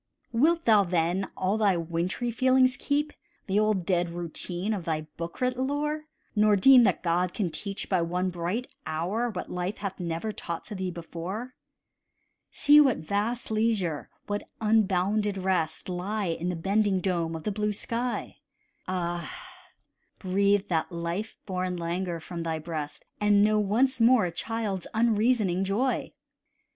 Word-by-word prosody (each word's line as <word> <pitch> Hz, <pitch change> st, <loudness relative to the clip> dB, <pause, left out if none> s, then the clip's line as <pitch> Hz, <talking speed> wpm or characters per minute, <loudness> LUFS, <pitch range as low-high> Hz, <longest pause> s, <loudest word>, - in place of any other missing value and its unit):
Wilt 320 Hz, +8 st, +2 dB
thou, 215 Hz, -3 st, +6 dB
then, 175 Hz, +1 st, 0 dB
all 195 Hz, +4 st, 0 dB
thy 200 Hz, -4 st, +3 dB
wintry 170 Hz, +8 st, -2 dB
feelings 255 Hz, +2 st, +4 dB
keep, 290 Hz, +2 st, -1 dB, 0.3 s
The 195 Hz, +1 st, +1 dB
old 210 Hz, -4 st, +1 dB
dead 175 Hz, -2 st, +1 dB
routine 175 Hz, +4 st, -4 dB
of 195 Hz, -4 st, -3 dB
thy 160 Hz, -2 st, -1 dB
book 170 Hz, 0 st, -6 dB
writ 250 Hz, 0 st, +1 dB
lore, 300 Hz, +3 st, -1 dB, 0.3 s
Nor 210 Hz, 0 st, +5 dB
deem 255 Hz, +6 st, +8 dB
that -, -, +1 dB
God 175 Hz, +1 st, +1 dB
can 185 Hz, -6 st, -1 dB
teach, 195 Hz, +5 st, -5 dB
by 185 Hz, -3 st, +2 dB
one 180 Hz, +2 st, -1 dB
bright 180 Hz, +10 st, -3 dB
hour, 190 Hz, +10 st, -1 dB
What 205 Hz, -, -6 dB
life 180 Hz, +3 st, -3 dB
hath 195 Hz, -1 st, -5 dB
never 170 Hz, +4 st, -2 dB
taught 170 Hz, -5 st, -6 dB
to 215 Hz, -, -7 dB
thee 190 Hz, -2 st, -3 dB
before? 180 Hz, +8 st, -6 dB, 1.0 s
See 295 Hz, +1 st, +6 dB
what 270 Hz, -5 st, +3 dB
vast 210 Hz, +8 st, -2 dB
leisure, 215 Hz, -8 st, 0 dB, 0.2 s
what 205 Hz, 0 st, -4 dB
unbounded 210 Hz, -1 st, +2 dB
rest, 185 Hz, -4 st, 0 dB
Lie 190 Hz, +2 st, -2 dB
in 165 Hz, +2 st, -2 dB
the 180 Hz, -, -1 dB
bending 195 Hz, +3 st, +1 dB
dome 170 Hz, -3 st, -1 dB
of 160 Hz, -, -6 dB
the 210 Hz, -, -1 dB
blue 210 Hz, +1 st, 0 dB
sky: 235 Hz, +4 st, -3 dB, 0.5 s
Ah! 175 Hz, -3 st, -2 dB, 0.9 s
breathe 200 Hz, +1 st, +2 dB
that 165 Hz, 0 st, 0 dB
life 170 Hz, +5 st, -4 dB
born 185 Hz, -2 st, -2 dB
languor 170 Hz, 0 st, -2 dB
from 170 Hz, +1 st, -6 dB
thy 165 Hz, -1 st, -2 dB
breast, 155 Hz, -2 st, -5 dB
And 205 Hz, -1 st, +4 dB
know 215 Hz, 0 st, +3 dB
once 240 Hz, +5 st, +2 dB
more 230 Hz, -3 st, +6 dB
a 175 Hz, -, -2 dB
child's 205 Hz, 0 st, -3 dB
unreasoning 220 Hz, -4 st, +2 dB
joy. 215 Hz, +7 st, 0 dB
195 Hz, 155 wpm, -27 LUFS, 175-220 Hz, 1.0 s, deem